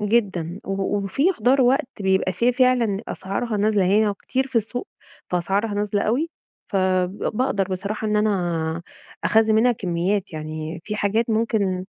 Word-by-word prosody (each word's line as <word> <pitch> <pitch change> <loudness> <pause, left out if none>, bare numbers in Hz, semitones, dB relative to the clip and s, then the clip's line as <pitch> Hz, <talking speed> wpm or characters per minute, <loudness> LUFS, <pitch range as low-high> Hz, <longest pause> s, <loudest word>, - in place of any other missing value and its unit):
جدًا، 200 -5 0
و 195 - -3 0.3
وفي 270 - +1
خُضار 270 -5 +2
وقت 250 -3 +1
بيبقى 190 -1 +2
في 235 +8 +2
فعلًا 245 -5 +2
أسعارها 215 +4 -3
نازلة 205 -1 +2
هي 205 +2 +3
كتير 265 +6 -2
في 265 -2 -4
السوق، 230 - -1 0.4
فأسعارها 195 +4 0
نازلة 205 0 0
أوي، 285 +10 0 0.4
فب 185 0 +1 0.2
بأقدر 250 -7 +1
بصراحة 200 +3 -3
إن 210 0 +1
أنا 175 -6 0 0.4
أخزّن 220 0 +4
منها 240 +3 +4
كمّيات، 190 -1 -1
يعني 155 +1 -5
في 210 - -3
حاجات 220 +3 +1
ممكن 215 -5 0
205 Hz, 145 wpm, -23 LUFS, 185-230 Hz, 0.4 s, أخزّن